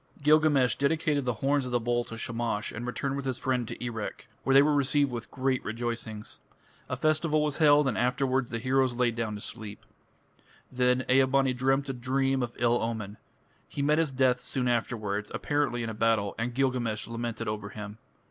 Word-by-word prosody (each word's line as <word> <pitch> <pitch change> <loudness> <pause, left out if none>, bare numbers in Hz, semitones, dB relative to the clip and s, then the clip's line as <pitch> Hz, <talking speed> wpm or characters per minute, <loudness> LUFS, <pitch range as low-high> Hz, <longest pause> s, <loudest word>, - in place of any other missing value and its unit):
Gilgamesh 150 -4 +4
dedicated 145 -1 0
the 125 - +1
horns 140 -1 +2
of - - -6
the 120 - +2
bull 120 +1 0
to 115 - -8
Shamash 115 -2 -2
and 120 +3 -6
returned 135 +2 -2
with 140 -1 -4
his 130 -2 -1
friend 125 -2 -1
to - - -7
Erech, 110 -3 -5 0.2
where 135 - +2
they 140 - +8
were 150 +1 +3
received 145 0 +2
with 120 -1 -6
great 130 0 -1
rejoicings. 110 -1 -5 0.5
A 130 - -1
festival 155 +2 +1
was 150 -2 -1
held, 150 -2 +5
and 125 - 0
afterwards 125 +1 +1
the 115 - -3
heroes 130 +1 +1
lay 120 -1 +2
down 115 -2 -3
to 105 - -8
sleep. 110 -3 -7 0.9
Then 125 0 +2
Ea 130 +1 +5
bani 135 0 +2
dreamt 135 +2 +1
a 135 - -2
dream 135 +2 0
of 120 -1 -3
ill 120 0 +2
omen. 110 -3 -4 0.5
He 140 - -3
met 150 +2 +3
his 160 -4 +1
death 130 -1 +2
soon 125 0 -2
afterwards, 110 -3 -1
apparently 145 -5 0
in 115 - -3
a - - -6
battle, 110 -2 +1
and 120 +1 -2
Gilgamesh 125 -5 0
lamented 115 -1 -4
over 105 -1 -3
him. 105 +1 -8
125 Hz, 195 wpm, -28 LUFS, 115-135 Hz, 0.9 s, they